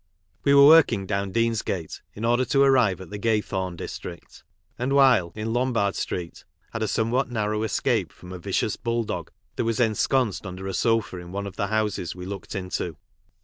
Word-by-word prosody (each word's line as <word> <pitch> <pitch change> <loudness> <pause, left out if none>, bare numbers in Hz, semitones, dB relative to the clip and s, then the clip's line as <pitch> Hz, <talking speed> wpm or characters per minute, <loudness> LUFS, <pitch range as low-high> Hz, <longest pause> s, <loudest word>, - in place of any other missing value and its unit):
We 140 - +4
were 140 0 +9
working 155 -10 +6
down 100 0 -2
Deansgate, 115 -7 -1
in 110 - -4
order 120 +2 +3
to 140 +2 +3
arrive 125 -9 +3
at 95 - -11
the 105 - -5
Q 115 +2 +2
ay 105 - +2
thorn 95 -3 -4
district, 85 0 -8 0.4
and 130 +3 0
while, 130 -11 +5
in 110 +1 -3
Lombard 120 -5 +1
street, 85 -2 -4 0.3
had 115 - -3
a 110 - +1
somewhat 120 +6 0
narrow 105 -2 -1
escape 110 - 0
from 90 - -13
a 90 - -7
vicious 100 +3 -1
bulldog 115 -1 -2 0.3
that - - +1
was 115 0 -1
ensconced 115 -1 +1
under 90 +1 -7
a 95 - -3
sofa 115 -1 +1
in 85 0 -10
one 100 +1 -4
of 100 - -7
the 100 - -1
houses 105 -5 -1
we 90 0 -7
looked 100 +2 -7
into. 90 -4 -3
105 Hz, 190 wpm, -25 LUFS, 95-120 Hz, 0.4 s, were